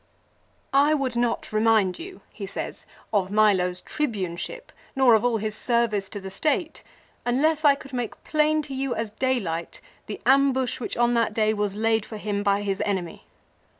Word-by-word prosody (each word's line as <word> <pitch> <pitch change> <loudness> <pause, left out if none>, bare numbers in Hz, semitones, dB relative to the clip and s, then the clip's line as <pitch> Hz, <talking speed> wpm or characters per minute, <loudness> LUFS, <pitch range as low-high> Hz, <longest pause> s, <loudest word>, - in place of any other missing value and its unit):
" - - -39 0.2
I 310 - +4
would 265 -4 -2
not 235 -2 -1
remind 215 -4 +3
you," 370 +3 -9
he - - -7
says, - - -6
" - - -29
of 195 -3 +1
Milo's 190 -4 +2
Tribune 205 - -2
ship - - -7 0.2
nor 265 -3 +5
of 220 0 +4
all 245 -2 +2
his 215 0 -3
service 215 -4 0
to 205 - -6
the 190 -1 -8
state, 305 - -1 0.4
unless 300 +6 +1
I 285 -2 +6
could 275 -1 -13
make 245 -3 -4
plain 305 0 +2
to 280 - -7
you 270 -1 -2
as 225 -2 -3
daylight 210 -9 -2 0.3
the 210 - -6
ambush 265 -1 +3
which 240 - -4
on 240 0 +3
that 230 -2 +1
day 215 -1 +2
was 205 -2 -1
laid 225 0 +1
for 215 - -8
him 205 -1 -2
by 200 0 +1
his 195 -1 -2
enemy. 185 -5 -3
225 Hz, 185 wpm, -25 LUFS, 205-265 Hz, 0.4 s, I